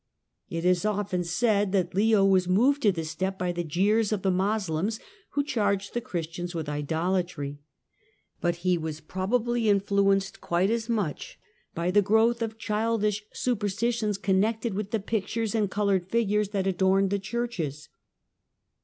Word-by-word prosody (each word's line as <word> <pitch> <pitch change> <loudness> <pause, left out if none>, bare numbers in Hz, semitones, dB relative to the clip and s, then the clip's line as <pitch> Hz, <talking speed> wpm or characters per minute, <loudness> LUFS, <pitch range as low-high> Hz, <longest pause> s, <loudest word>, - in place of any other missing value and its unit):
It 165 +1 -3
is 180 0 +3
often 205 -3 -1
said 200 +3 +1
that 185 -3 +1
Leo 205 +1 +4
was 190 -2 +3
moved 255 +10 +3
to 210 - +4
this 165 -3 -4
tep 190 +4 -2
by 180 -1 -1
the 175 0 -3
jeers 200 +7 +1
of 210 -3 -1
the 190 - +2
Moslems, 195 +1 0 0.3
who 285 - +1
charged 200 -7 -1
the 240 - -1
Jhristians 175 -4 -5
with 160 -2 -3
idolatry. 160 0 -2 0.8
But 175 0 0
he 180 -1 +3
was 155 -1 -4
probably 225 +7 0
influenced 200 -1 +2
[iiite 180 +4 +1
as 230 0 -2
much 205 -10 -2 0.4
by 170 +2 0
the 205 +2 +5
growth 220 +4 +3
of 225 -1 -3
childish 210 -1 0
superstitions 220 -1 -1
con 190 -1 +2
lected 225 +1 -1
with 200 +1 -3
the 225 - 0
pictures 220 +1 -2
and 215 -3 +1
coloured 195 -3 0
figures 210 -2 +1
that 200 -2 -1
adorned 190 +1 +2
he 200 - +1
churches. 195 - -4
200 Hz, 155 wpm, -27 LUFS, 180-220 Hz, 0.8 s, the